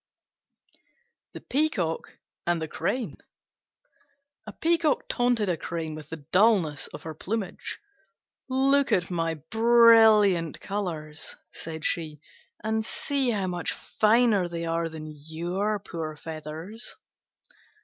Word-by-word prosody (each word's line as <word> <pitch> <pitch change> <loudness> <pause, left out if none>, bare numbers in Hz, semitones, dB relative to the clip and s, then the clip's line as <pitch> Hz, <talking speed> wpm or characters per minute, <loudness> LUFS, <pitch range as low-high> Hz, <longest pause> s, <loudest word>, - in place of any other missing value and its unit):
THE - - -8
PEACOCK 250 - -1 0.3
AND 175 -1 +2
THE 160 - -3
CRANE 245 +9 -2 1.3
A - - -5
Peacock 330 -2 +1
taunted 245 -4 +1
a 180 - +1
Crane 160 -1 -4
with 155 -1 -9
the 160 -3 -8
dullness 185 -8 +3
of - - -10
her 160 - -5
plumage. 195 +4 -4 0.7
"Look 275 +2 +3
at 180 0 +1
my 165 -2 0
brilliant 220 - +5
colours," 165 -7 -4 0.2
said 160 -1 -6
she, 155 -3 -1 0.4
"and 220 0 0
see 275 +3 -1
how 205 -4 0
much 175 -2 -2
finer 215 -3 +3
they 170 -1 -4
are 165 0 -1
than 160 -1 -8
your 175 +8 -2
poor 165 -6 -6
feathers." 160 +8 -6
180 Hz, 115 wpm, -27 LUFS, 160-225 Hz, 1.3 s, brilliant